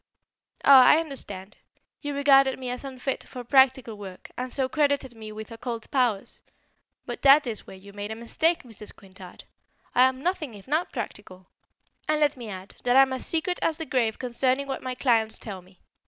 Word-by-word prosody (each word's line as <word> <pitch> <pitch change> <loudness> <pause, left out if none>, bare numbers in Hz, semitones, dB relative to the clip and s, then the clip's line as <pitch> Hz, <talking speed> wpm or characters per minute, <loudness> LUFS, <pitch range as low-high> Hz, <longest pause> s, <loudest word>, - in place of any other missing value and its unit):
"Ah, 265 -2 +9
I - - +7
understand. 210 - -6 0.4
You 290 -1 -4
regarded 275 -1 +5
me 255 -1 -5
as 250 - -6
unfit 265 0 -4
for 250 -2 -9
practical 260 -2 +3
work, 190 -2 -10
and 250 0 -5
so 265 0 -1
credited 285 -3 0
me 220 -2 -9
with 220 +2 -9
occult 230 0 -6
powers. 245 -7 0 0.6
But - - -6
that 280 +2 +7
is 225 -4 -4
where 190 - -10
you 200 +1 -14
made 205 0 -6
a 220 - -4
mistake, 320 +9 0
Mrs. 220 -4 -9
Quintard; 185 -2 -13 0.5
I'm 260 +1 +3
nothing 325 - -2
if 200 +2 -14
not 310 +5 0
practical. 200 -6 -7 0.6
And 305 0 +2
let 295 -1 +2
me 240 -4 -8
add, 190 -1 -9
that 245 +1 +3
I'm 270 -1 +6
as 260 - -4
secret 340 +2 0
as 320 - +1
the 325 - -5
grave 235 -6 0
concerning 255 +2 0
what 270 -1 -4
my 255 -1 -4
clients 230 -4 +1
tell 195 -4 -7
me. 185 +1 -23
255 Hz, 185 wpm, -26 LUFS, 220-275 Hz, 0.6 s, Ah